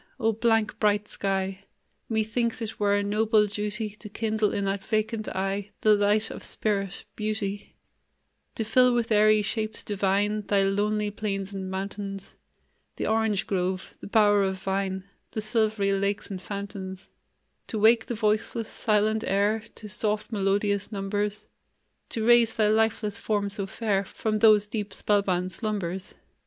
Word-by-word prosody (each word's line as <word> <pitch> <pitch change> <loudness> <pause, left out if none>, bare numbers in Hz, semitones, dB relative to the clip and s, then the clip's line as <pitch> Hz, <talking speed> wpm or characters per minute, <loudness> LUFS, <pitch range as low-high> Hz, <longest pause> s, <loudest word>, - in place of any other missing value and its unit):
O 225 -2 +3
blank, 225 -1 +1
bright 210 -1 +2
sky! 195 0 -2 0.4
Methinks 225 +2 0
it 225 -2 -5
were 205 -1 +3
a 205 - +1
noble 215 +1 +3
duty 210 +1 -3
To 210 +1 -11
kindle 215 0 0
in 200 - -1
that 195 0 -1
vacant 215 0 -1
eye 195 +1 -2
The 215 - +6
light 210 +2 +2
of - - -7
spirit 195 -3 -2
beauty 210 -2 -3 0.8
To 225 - -1
fill 250 +3 +4
with 235 -1 0
airy 215 0 +5
shapes 215 +1 -3
divine 205 +1 +1
Thy 200 -1 +3
lonely 205 +2 +1
plains 200 -2 -3
and 190 -1 -4
mountains, 195 +1 -5 0.6
The - - -3
orange 220 -3 +1
grove, 185 -1 -2
the - - -7
bower 205 -1 +4
of 190 -1 0
vine, 190 0 -2 0.3
The 215 - -2
silvery 215 -2 +1
lakes 200 +1 -1
and 185 -2 -5
fountains; 195 -2 -6 0.6
To 220 - -4
wake 220 +2 +5
the 240 - -2
voiceless, 215 +1 0
silent 215 0 +1
air 205 +3 +2
To 215 - -9
soft, 210 +2 -1
melodious 200 0 0
numbers; 205 +1 -2 0.6
To 220 -1 -2
raise 235 -1 +5
thy 215 -1 +3
lifeless 220 -1 +1
form 205 -2 0
so 200 -1 -4
fair 200 -2 0
From 215 +2 -2
those 215 -2 +6
deep, 210 -2 -4
spell 205 +1 +2
bound 185 -1 -1
slumbers. 195 -4 -4
210 Hz, 150 wpm, -27 LUFS, 195-220 Hz, 0.8 s, The